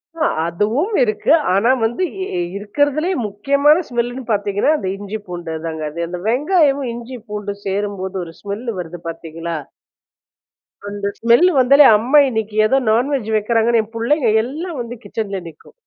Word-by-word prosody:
ஆ. 320 -1 0 0.2
அதுவும் 220 - 0
இருக்கு. 435 -3 0 0.2
ஆனா 210 +6 +3
வந்து 240 +11 -1 0.2
இ 185 - -3 0.2
இருக்கிறதுலே 290 - 0 0.2
முக்கியமான 280 - +3
ஸ்மெல் 240 -1 0
லுன்னு 255 +2 -7
பார்த்தீங்கன்னா, 205 +5 +1
அந்த 195 - -4
இஞ்சி 205 +2 -5
பூண்டு 175 -2 -6
அதாங்க. 160 -1 -5
அது 170 +2 -3
அந்த 180 +1 -5
வெங்காயமும், 280 +1 +2
இஞ்சி 240 +2 -8
பூண்டு 205 -1 -4
சேரும்போது 195 -1 -3
ஒரு 165 -1 -10
ஸ்மெல் 205 +4 -5
வருது 175 0 -7
பார்த்தீங்களா? 165 0 -6 1.3
அந்த 205 0 -5
ஸ்மெல் 235 +10 +5
வந்தாலே 275 +3 +7
அம்மா 255 +8 +4
இன்னைக்கி 220 -3 -3
ஏதோ 265 - +3
நான்வெஜ் 245 0 0
வைக்கிறாங்கன்னு 225 +1 +2
என் 220 +2 -17
புள்ளைங்க 240 +2 +1
எல்லாம் 310 +5 -5
வந்து 240 0 -6
கிச்சன்ல 200 -3 -4
நிக்கும். 155 - -18
225 Hz, 150 wpm, -19 LUFS, 200-275 Hz, 1.3 s, வந்தாலே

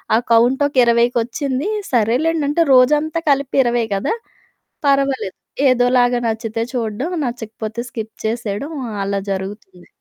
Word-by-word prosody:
ఆ - - +5 0.2
కౌంటొక 265 +5 +3
ఇరవైకొచ్చింది. 240 - +1 0.2
సరేలేండంటే, 285 +7 +1
రోజంతా 295 +5 +3
కలిపి 275 -1 0
20 240 -1 +1
గదా! 195 - -1 0.7
పర్వాలేదు, 275 -7 +1 0.3
ఏదోలాగా 245 0 +3
నచ్చితే 225 0 -3
చూడడం, 235 +6 -2 0.2
నచ్చకపోతే 225 -1 -5
స్కిప్ 220 -2 -6
చేసేయడం 230 +5 -3 0.3
అలా 200 0 -1
జరుగుతుంది. 190 -2 -6
240 Hz, 100 wpm, -19 LUFS, 220-275 Hz, 0.7 s, ఆ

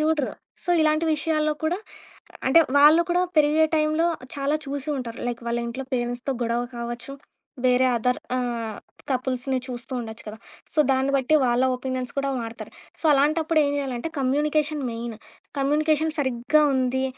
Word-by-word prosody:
జూడరు. 305 -3 +1 0.3
So, 355 - -1
ఇలాంటి 310 +1 +2
విషయాల్లో 305 0 0
కూడా 350 +4 0 0.7
అంటే, 330 +5 +7 0.2
వాళ్ళు 300 +3 +7
కూడా 355 +1 +3
పెరిగే 305 +1 +5
టైంలో 310 +2 +2 0.3
చాలా 280 +1 0
చూసి 280 +1 -4
ఉంటారు. 235 -2 -6
లైక్ 240 0 -5
వాళ్ళ 235 - 0
ఇంట్లో 260 +3 -5
పేరెంట్స్‌తో 245 +2 -2
గొడవ 235 +1 0 0.2
కావచ్చు, 235 +3 -5 0.5
వేరే 255 0 +4
అదర్ 250 +2 +1 0.2
ఆహ్, 235 -3 -3 0.3
కపుల్స్‌ని 255 0 -1
చూస్తూ 245 0 -6
ఉండొచ్చు 225 -1 -7
కదా! 210 - -7 0.4
సో, - - -4
దాన్ని 270 +1 +2
బట్టి 270 +3 +2
వాళ్ళ 245 +1 +2
ఒపీనియన్స్ 255 -1 -4
కూడా 275 0 0
వాడతారు. 230 -1 -7 0.3
సో, - - -12
అలాంటప్పుడు 310 +3 +2
ఏం 285 - +1
జేయాలంటే 270 0 -3
కమ్యూనికేషన్ 295 +3 +1
మెయిన్. 230 0 -5 0.4
కమ్యూనికేషన్ 305 +3 +2
సరిగ్గా 260 +2 +2
ఉంది 260 0 +1
270 Hz, 145 wpm, -24 LUFS, 245-305 Hz, 0.7 s, అంటే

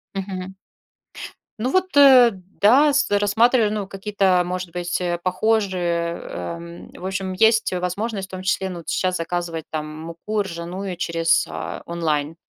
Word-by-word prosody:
Мгм. 190 -1 -5 1.0
Ну 245 - 0
вот, 370 -2 0
э, 260 -4 +8
да, 205 +10 +3
с 285 0 +1
рассматриваю, 220 +2 +3
ну, 205 -2 -3
какие-то, 195 -2 +1
а, - - 0
может 180 -1 -4
быть, 175 0 -2
э, 175 -1 -1
похожие, 185 -4 0
эм, 85 0 -7
в 180 - -10
общем 190 0 -3
есть, 220 +4 +3
э, 180 - -2
возможность, 195 +3 -3
в - - -21
том 185 0 -6
числе, 190 0 -1
ну 180 - -6
вот 160 - -9
щас 185 -1 0
заказывать, 165 -1 -3
там, 155 -1 -3 0.2
муку 170 +6 -3
ржаную 180 0 -5
через, 165 -1 +1
а, - - -6
онлайн. 160 -2 -2
185 Hz, 160 wpm, -22 LUFS, 170-205 Hz, 1.0 s, э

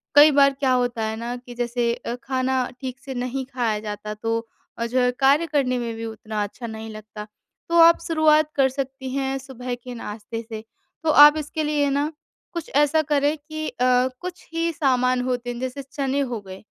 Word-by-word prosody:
कई 295 +1 +9
बार 275 -1 +5
क्या 265 -2 +2
होता 245 -3 +1
है 220 0 -2
ना 240 +2 -4
कि 245 0 -10
जैसे 240 -1 0
अ, 235 - -5
खाना 260 -1 0
ठीक 260 0 -5
से 270 - -5
नहीं 255 +1 -3
खाया 225 -4 0
जाता, 210 0 -5
तो 225 +2 -2 0.3
अ, 235 - 0
जो 250 +2 0
है 250 0 +3
कार्य 280 +5 +4
करने 270 -5 +1
में 230 -1 -3
भी 225 0 -5
उतना 215 -1 -4
अच्छा 230 +4 -7
नहीं 220 0 -7
लगता। 215 0 -9 0.4
तो 340 - +2
आप 335 0 +8
शुरुआत 310 -1 +3
कर 270 -2 +4
सकती 265 0 -5
हैं 270 0 -1
सुबह 255 -2 -6
के 245 +1 -9
नाश्ते 225 +1 -6
से। 220 -1 -6 0.4
तो 320 - +1
आप 295 0 +9
इसके 310 +1 -3
लिए 295 -1 +1
ना, 285 +3 0 0.4
कुछ 340 -2 -5
ऐसा 295 +2 +4
करें 290 +2 +2
कि 310 +1 -6
अ, 250 0 +2
कुछ 365 0 -8
ही 335 0 0
सामान 255 -5 +2
होते 245 -1 -2
हैं 240 0 -4
जैसे 260 +2 -4
चने 275 +1 -2
हो 230 - -2
गए। 190 0 -11
255 Hz, 200 wpm, -23 LUFS, 235-285 Hz, 0.4 s, कई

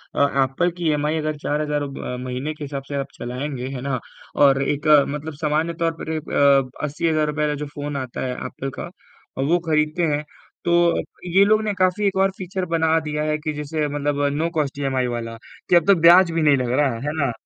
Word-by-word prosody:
अ, - - +1 0.2
Apple 150 +7 0
की 170 -2 -2
EMI 150 +1 0
अगर 155 -1 -2
4000 150 +1 -2
हज़ार 150 -1 -1
रब 140 -1 -6
अ, 125 - -3
महीने 130 +4 -3
के 150 - -9
हिसाब 140 -1 -5
से 145 - -5
आप 135 -1 -2
चलाएँगे, 130 +1 -4
है 125 - -5
ना? 135 -2 -2 0.4
और 135 -1 +5
एक 145 +2 -2 0.2
मतलब 150 +2 -5
सामान्य 155 +2 0
तौर 165 - +2
पर - - -6
रे 160 - -1
अ, 140 -3 +3
₹80,000 150 0 0
का 150 - -1
जो - - -3
फ़ोन 145 0 -4
आता 130 -2 -5
है 125 - -2
एप्पल 135 - -5
का - - -5 0.5
अ, - - -1
वो 170 +6 +2
खरीदते 155 +2 +1
हैं 150 - -3 0.4
तो 175 - +1 0.3
अप - - -4 0.3
ये 195 - +8
लोग 215 +1 +4
ने 210 -1 -1
काफ़ी 185 +2 +1
एक 195 - -1
और 195 0 +3
फीचर्स 185 -1 -4
बना 160 -1 +2
दिया 150 -1 -3
है 155 0 0
कि 155 0 -3
जैसे 150 +1 -2
मतलब 145 0 -1
नो 165 +2 0
कॉस्ट 145 -2 -1
ईएमआई 130 -2 0
वाला, 115 -1 -4 0.3
कि 175 - +5
अब 170 - +5
तो 200 - +7
ब्याज़ 170 +1 +7
भी 165 - +1
नहीं 145 -2 +4
लग 125 -1 -1
रहा, 140 -5 +2
है 150 - 0
ना? 135 -4 +1
150 Hz, 225 wpm, -22 LUFS, 140-160 Hz, 0.5 s, ये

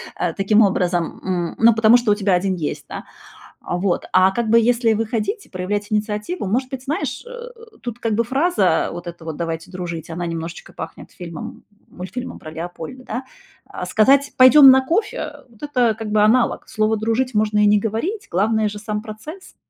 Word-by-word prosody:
а, 175 -2 -2
таким 205 +4 +3
образом 180 -4 0
м, 175 -3 -2
ну, 230 +1 +6
потому 225 +1 +5
что 240 -3 +3
у - - +4
тебя 200 -2 +1
1 185 +1 +1
есть, 160 -4 -4
да. - - -7 0.6
А, - - -4
вот. 180 0 -1
А 185 +1 +6
как 230 +3 -2
бы 230 +1 +6
если 230 -1 +2
выходить 225 - -2
и - - -24
проявлять 205 +3 -3
инициативу, 210 - -2
может 255 +7 -1
быть, 265 -2 -6
знаешь, 300 +7 -3
э, - - -11 0.5
тут 240 -2 -6
как 225 -3 -1
бы 230 +2 +1
фраза 240 - +1
вот 175 - -8
эта 170 -1 -9
вот: 160 -2 -5
"Давайте 165 0 -4
дружить"- 175 -3 -6
она 175 +2 -4
немножечко 165 0 -6
пахнет - - -9
фильмом 170 -3 -9 0.3
мультфильмом 190 +8 -7
про 155 - -10
Леопольда, 175 +9 -8
да? 250 +3 -5 0.4
А - - -7
сказать: 275 +5 +3
"Пойдём 265 +2 +9
на 260 0 +6
кофе"- 340 +11 -1 0.3
э, - - -21
это 245 -6 +2
как 220 -2 -5
бы 210 0 +3
аналог, 235 +4 +2
слово 215 +1 0
"дружить" 230 +4 -1
можно 210 0 +1
и 210 - +5
не 205 0 +5
говорить, 230 - -3
главное 215 +3 +1
же 210 - -8
сам 210 0 -4
процесс. 230 - -10
215 Hz, 190 wpm, -20 LUFS, 185-240 Hz, 0.6 s, Пойдём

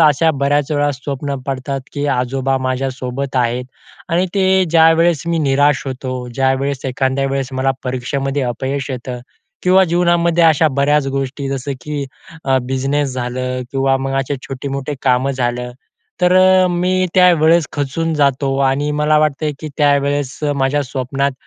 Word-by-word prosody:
अशा 155 +1 +4
बऱ्याच 145 +1 +1
वेळा 145 0 +1
स्वप्न 140 +1 -4
पडतात 135 0 -3
की 145 0 -3
आजोबा 135 +2 -1
माझ्यासोबत 130 0 -3
आहेत 125 0 0 0.4
आणि 175 +3 +1
ते 190 -1 +3
ज्यावेळेस 165 -1 +4
मी 170 -1 0
निराश 145 -2 +2
होतो, 130 -1 -5
ज्यावेळेस 135 +1 0
एखाद्या 130 +1 0
वेळेस 135 -1 -2
मला 130 +1 +1
परीक्षेमध्ये 135 +2 -2
अपयश 130 +3 -3
येतं. 125 -1 -5 0.4
किंवा 185 +1 +5
जीवनामध्ये 170 -1 +2
अशा 160 0 +4
बऱ्याच 140 +1 +1
गोष्टी 135 +1 -3
जसं, 135 +1 -3
की 150 -2 -4 0.4
अ, 135 -1 +2
बिझनेस 135 +2 -1
झालं 125 +1 -3
किंवा 135 0 +2
मग 135 0 -3
असे 135 +1 -3
छोटे-मोठे 140 +1 -4
कामं 130 +1 +2
झालं, 125 -1 -2 0.5
तर 180 0 +4
अ, 185 0 +5
मी 185 +1 +1
त्यावेळेस 170 -3 +5
खचून 155 +3 -2
जातो 140 -2 +1
आणि 145 +2 -1
मला 150 0 +3
वाटतं 155 0 0
की 155 - -5
त्यावेळेस 145 -1 +1 0.2
माझ्या 140 +2 +1
स्वप्नात 135 +1 -2
140 Hz, 145 wpm, -17 LUFS, 130-150 Hz, 0.5 s, किंवा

